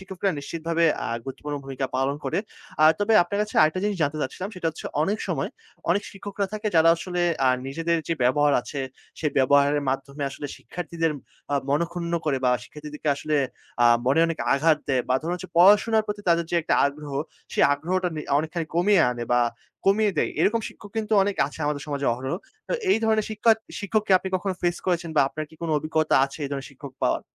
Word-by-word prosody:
শিক্ষকরা 190 0 -2
নিশ্চিতভাবে 165 +3 -1 0.2
আ - - -2 0.2
গুরুত্বপূর্ণ 145 +2 -5
ভূমিকা 135 0 -3
পালন 135 +2 0
করে। 135 - 0 0.4
আ - - +8
তবে 205 +2 +1
আপনার 200 +4 -3
কাছে 210 - -6
আরেকটা 155 +4 +2
জিনিস 205 -2 0
জানতে 145 +1 0
চাচ্ছিলাম 185 +8 -4
সেটা 180 -3 -3
হচ্ছে, - - -8 0.2
অনেক 205 +6 0
সময় - - -1 0.4
অনেক 200 +4 +2
শিক্ষকরা 200 0 -4
থাকে 215 0 -4
যারা 165 +1 +6
আসলে 180 0 -2 0.2
আ - - +5 0.2
নিজেদের 165 +3 0
যে 165 - +1
ব্যবহার 145 +4 +3
আছে 140 +3 -6 0.4
সেই 150 - 0
ব্যবহারের 140 +2 +4
মাধ্যমে 140 +2 -3
আসলে 145 - -6
শিক্ষার্থীদের 165 +3 -3 0.4
আ - - +3
মন-ক্ষুন্ন 170 +4 -1
করে 140 -3 +1
বা 125 - +4
শিক্ষার্থীদেরকে 150 0 -7
আসলে 155 +1 -1 0.5
আ - - +6 0.2
মনে 140 +5 +4
অনেক 165 -1 -3
আঘাত 155 +2 +3
দেয়, 130 -3 +2
বা 130 - +3
ধরুন 170 +3 -1
হচ্ছে 185 +1 -8
পড়াশোনার 210 +4 +5
প্রতি 210 0 -4
তাদের 170 0 +3
যে 175 - +1
একটা - - +1
আগ্রহ, 145 0 -6 0.4
সেই - - +4
আগ্রহটা 180 +6 -1
নে - - -2 0.2
অনেকখানি 160 +1 -3
কমিয়ে 180 +2 +4
আনে 120 -1 -4
বা 120 - +4 0.5
কমিয়ে 205 +1 +4
দেয়। - - +1
এরকম 220 +7 +3
শিক্ষক 205 - -13
কিন্তু 220 0 -2
অনেক 200 0 -1
আছে 145 - -10
আমাদের 145 -1 -1
সমাজে 140 -2 -2
অহরহ। 130 +6 -3 0.3
তো - - -2 0.2
এই - - +4
ধরনের 220 -1 +2
শিক্ষা 215 +2 +2 0.3
শিক্ষককে 210 0 0
আপনি 190 - -5
কখনো 190 +1 -3
ফেস 175 0 +1
করেছেন? 175 -2 0
বা - - +6
আপনার 155 +2 -5
কি - - -16
কোন 170 - -2
অভিজ্ঞতা 155 +1 0
আছে 140 +3 -8
এই - - -3
ধরনের 140 -1 -4
শিক্ষক 135 0 -11
পাওয়ার? - - +1
165 Hz, 195 wpm, -25 LUFS, 145-190 Hz, 0.5 s, আ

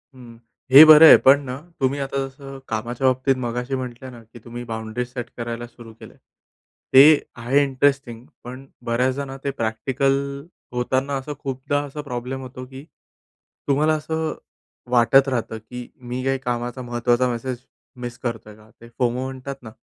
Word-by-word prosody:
हं. 120 -2 -14 0.3
हे 140 +4 +11
बरं 155 +1 +9
आहे. - - +10
पण 140 +2 +7
ना, 125 - -3 0.2
तुम्ही 135 +1 0
आता 140 0 -3
जसं 135 0 -11
कामाच्या 120 +4 -2
बाबतीत 130 +1 +2
मगाशी 125 +3 -3
म्हटलं 130 0 -7
ना 120 -2 -13
की 115 +2 -16
तुम्ही 120 0 -7
बाउंडरी 110 +2 -4
सेट 125 -1 -7
करायला 120 0 -5
सुरू 120 -1 -14
केलं - - -14
आहे. - - -28 0.7
ते 145 +3 +8 0.2
आहे 135 +5 +2
इंटरेस्टिंग, 135 -3 -1 0.2
पण 130 +2 -9 0.2
बऱ्याचदा 130 +4 0
ना, 135 0 -8
ते 140 - -1
प्रॅक्टिकल 125 +5 0 0.6
होताना 130 +3 -1
असं 140 +3 -6
खूपदा 135 +1 -2
असा 145 +2 -7
प्रॉब्लेम 130 -1 -5
होतो 130 0 -9
की 135 +1 -11 0.8
तुम्हाला 150 +3 +2
असं 160 0 -3 0.6
वाटत 125 +3 +4
राहतं 115 -3 -3
की 120 +2 -9 0.2
मी 130 +1 -3
काही 135 0 +1
कामाचा 120 +1 -3
महत्त्वाचा 120 +1 0
मेसेज 125 +2 -4 0.4
मिस 120 -1 -6
करतो 115 -3 -5
आहे 105 - -14
का? 110 0 -20
ते 115 - -13
फोमो 125 0 0
म्हणतात 130 +1 -6
ना, 110 - -10
130 Hz, 165 wpm, -22 LUFS, 120-135 Hz, 0.8 s, हे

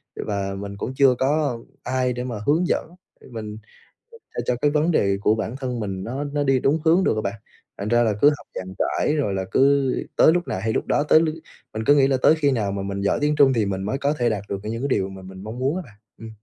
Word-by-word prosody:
Và 100 -1 -3
mình 100 0 -7
cũng 130 - -4
chưa 135 -2 +5
có 140 -2 +1 0.2
ai 130 -1 0
để 125 0 -4
mà 125 -3 -4
hướng 165 +4 +3
dẫn, - - -1 0.3
để - - -15
mình 110 -2 -6 0.5
cho 465 - -14 0.3
cho 125 - +1
cái 145 - +3
vấn 155 +3 +2
đề 100 -9 +2
của 105 +1 +3
bản 110 +3 -4
thân 125 -3 -4
mình 95 -3 -4
nó 135 +5 -4
nó 145 0 -2
đi 135 -1 +2
đúng 145 +5 +1
hướng 170 +4 +4
được - - +2
á - - 0
bạn. 100 0 -4 0.4
Thành 100 - -4
ra 120 +1 +4
là 110 - +1
cứ 145 - +8
học - - -16
dàn 95 - -5
trải 150 - 0
rồi 140 -10 0
là 95 -1 -2
cứ 140 -1 +3 0.2
tới 160 - +6
lúc 175 0 -1
nào - - -2
hay 110 +3 -1
lúc - - -1
đó, 145 - +2
tới 155 - +5
lướt 160 -1 0 0.4
mình 110 - -3
cứ 145 - +6
nghĩ 135 -2 +5
là 135 -1 +2
tới 155 +5 +5
khi 145 -3 +1
nào 110 -6 0
mà 100 0 -3
mình 100 0 -4
giỏi 100 - +1
tiếng 150 0 +2
Trung 140 -2 +5
thì 110 -3 +1
mình 95 -1 -3
mới 105 +7 -2
có 140 +1 0
thể 120 -6 0
đạt 105 -2 -2
được, 100 - -2
kiểu, 105 - -4
những 115 +2 -4
cái 140 - +1
điều 95 -7 0
mà 95 0 -10
mình 95 +1 -11
mong 110 +3 -7
muốn 135 +5 0
á 185 - -3
bạn, 105 - -17 0.2
ừm. 115 0 -9
125 Hz, 280 wpm, -23 LUFS, 100-145 Hz, 0.5 s, cứ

